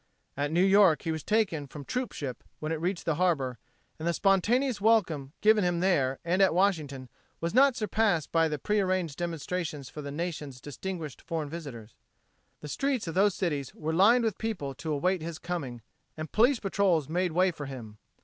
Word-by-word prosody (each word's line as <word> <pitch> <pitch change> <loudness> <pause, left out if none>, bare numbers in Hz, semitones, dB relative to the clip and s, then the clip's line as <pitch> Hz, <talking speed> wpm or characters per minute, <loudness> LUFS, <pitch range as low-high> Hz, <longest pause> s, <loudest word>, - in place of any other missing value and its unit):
At 145 +1 -1
New 175 +3 +3
York 195 -6 +5
he 165 - -1
was 160 -1 -3
taken 195 -10 0
from 145 +2 -9
the - - -19
troop 250 - -2
ship 130 -4 -6
when 155 +1 -4
it 160 -1 -2
reached 180 +1 -2
harbor 150 -6 +1 0.4
and 160 - -3
the 170 - +2
spontaneous 210 +6 +2
welcome 170 -11 +2
given 215 -1 +5
him 175 -1 +1
there 140 -8 +2
and 180 +3 +2
at 190 -3 +4
Washington 155 -9 0 0.3
was 170 +2 -2
not 270 +1 +5
surpassed 210 -7 0
by 165 -1 +3
the 150 -1 -2
prearranged 185 -3 0
demonstrations 165 -4 -3
for 150 - -8
the 145 - -6
Nation's 150 -4 -5
distinguished 155 +1 -6
foreign 160 -3 -4
visitors. 125 -10 -8 0.7
The 150 - -7
streets 270 - -1
of 165 - -4
those 195 +1 +3
cities 150 -8 -2
were 160 +1 -3
lined 225 +8 +5
with 220 -3 -1
people 190 -12 -3
to 155 +4 -5
await 180 +5 +1
his 165 0 -5
coming 145 -10 -5 0.3
and 155 -1 -6
police 240 +3 +4
patrols 190 -7 +1
made 175 +1 0
way 185 +2 +3
for 145 -4 -7
him. 115 -6 -9
170 Hz, 190 wpm, -29 LUFS, 145-195 Hz, 0.7 s, York